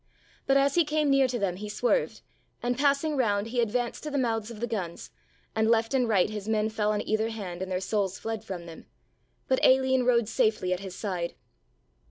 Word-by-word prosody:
But, 275 - +5
as 275 0 +3
he 345 - +4
came 300 -1 +1
near 275 -1 +4
to 250 -1 -2
them, 190 -5 -1
he 210 +2 -6
swerved 245 - 0 0.4
and, 245 +1 0
passing 285 +3 +2
round, 215 -4 +1
he 240 +1 +1
advanced 235 +1 -1
to 305 - -5
the 285 - -2
mouths 225 -4 0
of 230 -3 -9
the 235 - -1
guns, 195 -8 -5 0.4
and 220 0 +2
left 230 +2 +2
and 250 -3 +2
right 195 -5 +4
his 210 0 -6
men 215 0 +1
fell 215 -1 0
on 210 -1 -2
either 220 +1 +1
hand 190 -6 -6
and 190 0 -4
their 180 - 0
souls 195 -1 -1
fled 225 -1 -4
from 185 -5 -6
them; 165 -1 -11 0.6
but 260 - +1
Aline 260 0 +4
rode 240 -3 +3
safely 215 -4 +1
at 180 - -3
his 190 -2 -8
side. 180 -5 -3
225 Hz, 215 wpm, -28 LUFS, 200-255 Hz, 0.6 s, But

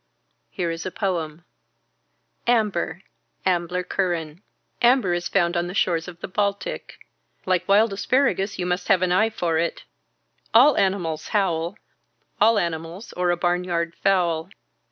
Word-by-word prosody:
Here 175 -3 -2
is 165 0 -5
a - - -3
poem. 175 -5 -3 1.0
Amber. 200 -7 +1 0.4
Ambler 180 0 0
Curran. 175 -3 -2 0.4
Amber 240 -7 +4
is 175 0 -1
found 175 -3 +1
on 175 0 0
the 180 - -6
shores 170 -4 +1
of 175 0 -10
the - - -4
Baltic. 200 +1 -3 0.4
Like 185 -1 0
wild 205 +2 +4
asparagus 200 -3 +1
you 180 - -2
must 180 0 -2
have 190 -4 +4
an 180 - +1
eye 220 +5 +3
for 170 -7 -1
it. 170 0 -2 0.7
All 265 +5 +7
animals 185 -5 0
howl. 180 -3 0 0.6
All 220 +1 +5
animals 170 +3 -4
or 180 0 0
a 175 - +2
barnyard 175 -1 0
fowl. 175 -4 +1
180 Hz, 140 wpm, -23 LUFS, 170-200 Hz, 1.0 s, All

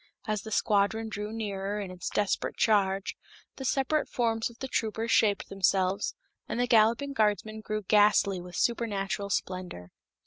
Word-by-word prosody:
As 215 -2 -1
the 220 - -8
squadron 215 +1 +1
drew 210 0 -5
nearer 205 -2 -3
in 195 -3 -5
its 180 -1 -5
desperate 205 -2 -1
charge, 195 -3 +2 0.4
the 265 - -6
separate 275 +4 +1
forms 225 -2 0
of 235 - -16
the 265 - -5
troopers 225 -1 -2
shaped 205 -2 +3
themselves, 195 0 +1 0.3
and - - -2
the 245 - +3
galloping 235 +4 +3
guardsmen 215 -1 0
grew 215 0 -3
ghastly 205 -2 +4
with 180 -1 -10
supernatural 200 -4 -1
splendor. 180 - -4
210 Hz, 150 wpm, -29 LUFS, 195-225 Hz, 0.4 s, ghastly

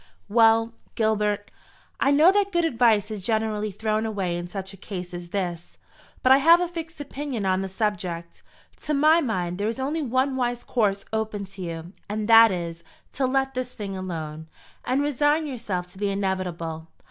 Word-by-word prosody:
"Well, 225 +1 +4 0.2
Gilbert, 210 -2 0 0.5
I - - +3
know 300 +6 +6
that 400 0 +1
good 345 -2 +2
advice 230 -7 +3
is 210 -2 -5
generally 215 0 -1
thrown 215 +2 -1
away 195 -6 -2
in 175 0 -4
such 190 +1 -6
a - - -9
case 180 -2 -7
as 175 0 -7
this; 175 -3 -4 0.5
but 255 - +5
I 265 - +9
have 330 +5 +6
a 355 - 0
fixed 330 -1 -7
opinion 275 -6 -4
on 190 0 +2
the 195 - -4
subject. 180 -4 -3 0.4
To 300 - -1
my 310 +4 +5
mind, 180 - -2
there 205 - 0
is 225 - -2
only 295 +5 -1
one 260 0 0
wise 245 -2 -1
course 200 -4 0
open 220 -2 -2
to 195 - -9
you, 170 0 -6 0.2
and 210 0 -2
that 225 -1 +8
is, 170 -2 -4 0.3
to 260 0 0
let 270 +1 0
this 250 0 -4
thing 200 -3 -5
alone, 160 -4 -5 0.4
and 260 +3 +1
resign 295 +2 +2
yourself 205 -10 -4
to 190 - -15
the 205 -1 0
inevitable. 180 -5 -3
215 Hz, 180 wpm, -25 LUFS, 185-260 Hz, 0.5 s, I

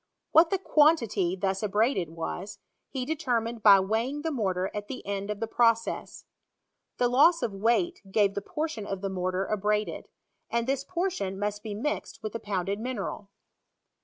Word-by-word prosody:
What 325 +1 +6
the 390 - +1
quantity 290 - +3
thus 190 0 -1
abraded 210 - +1
was, 175 +5 -5 0.3
he 260 -2 -3
determined 240 -7 -1
by 200 -2 +8
weighing 230 +9 -1
the 325 - -1
mortar 190 -8 -1
at 205 0 -5
the 260 - -7
end 200 0 -3
of 210 -1 -3
the 225 - -1
process. 230 0 0 0.7
The 245 - +3
loss 295 +8 +5
of 220 - -1
weight 240 - +1
gave 200 -1 +3
the 200 - -3
portion 300 -3 -4
of 195 -1 -4
the 195 - -2
mortar 185 +1 -1
abraded; 210 +1 -1 0.4
and 235 0 0
this 270 +1 -1
portion 345 - -2
mu3t 205 +1 -2
be 210 -1 -5
mixed 295 +8 -4
with 215 - -4
the 230 - -3
pounded 200 -1 -2
mineral. 220 -4 -4
215 Hz, 165 wpm, -28 LUFS, 195-260 Hz, 0.7 s, by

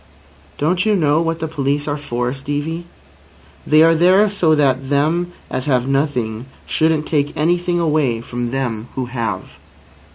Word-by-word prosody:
"Don't 180 +5 +1
you 215 -1 +2
know 155 -3 +2
what 165 0 -1
the 160 -1 -3
police 145 -1 -1
are 145 - -1
for, 125 -4 -3
Stevie? 145 +5 -4 0.8
They 155 +1 +6
are 165 0 +5
there 185 +5 +4
so 165 -6 +2
that 135 -2 +1
them 160 +5 +1 0.2
as 130 0 -4
have 130 -3 +1
nothing 130 -5 -1 0.2
shouldn't 160 -1 +1
take 145 -2 -1
anything 175 +2 +1
away 150 -8 +1
from 120 +1 -4
them 120 -4 -3
who 130 - -2
have." 120 -2 -4
145 Hz, 155 wpm, -19 LUFS, 130-165 Hz, 0.8 s, They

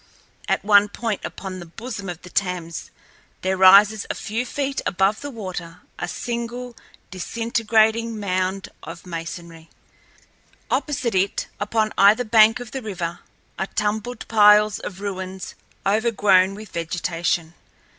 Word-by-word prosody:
At - - 0
one 205 0 +6
point 220 -1 -3
upon 190 -1 -6
the 175 - -8
bosom 215 +1 -7
of 175 -1 -7
the 180 - -11
Thames 180 -4 -2 0.5
there 190 +1 0
rises 200 +3 +6
a - - -2
few 230 +4 -3
feet 275 +1 -2
above 195 +3 +1
the 285 - -5
water 180 -7 -7 0.2
a 175 - -2
single, 235 +3 -5 0.4
disintegrating 225 +2 +1
mound 185 -1 -1
of 165 +3 -10
masonry. 165 -1 -7 1.0
Opposite 260 -6 0
it, 190 +1 0
upon 215 +1 0
either 205 +5 +6
bank 220 0 +5
of 245 -3 -8
the 265 - -4
river, 180 -6 -4 0.4
are 190 - -1
tumbled 215 +3 -3
piles 210 -1 +5
of 190 0 -7
ruins 190 -2 -5 0.3
overgrown 200 -3 +3
with 215 -1 -10
vegetation. 170 0 -2
205 Hz, 130 wpm, -22 LUFS, 185-225 Hz, 1.0 s, one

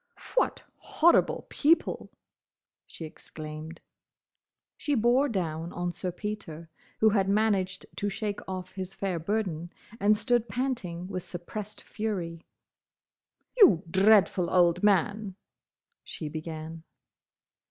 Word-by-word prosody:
"What - - +1
horrible 340 +2 +3
people!" 320 +3 +2 0.8
she 165 - -8
exclaimed. 155 +1 -9 0.9
She 290 - -1
bore 250 +5 +3
down 170 -5 -2
on 175 0 -2
Sir 180 +1 -3
Peter, 170 -5 -6 0.3
who 220 - +6
had 195 -2 +2
managed 200 -3 +1
to 205 - -1
shake 205 0 -3
off 185 -1 -5
his 190 0 -6
fair 190 -4 -2
burden, 175 -3 -2 0.3
and 210 +2 +4
stood 240 0 +1
panting 235 -10 -2
with 185 -2 -4
suppressed 185 +4 -6
fury. 175 -6 -4 1.1
"You 330 - +7
dreadful 190 -2 +4
old 175 -1 +4
man—" 205 0 +2 0.7
she 155 - -6
began. 160 +1 -6
190 Hz, 110 wpm, -28 LUFS, 170-215 Hz, 1.1 s, You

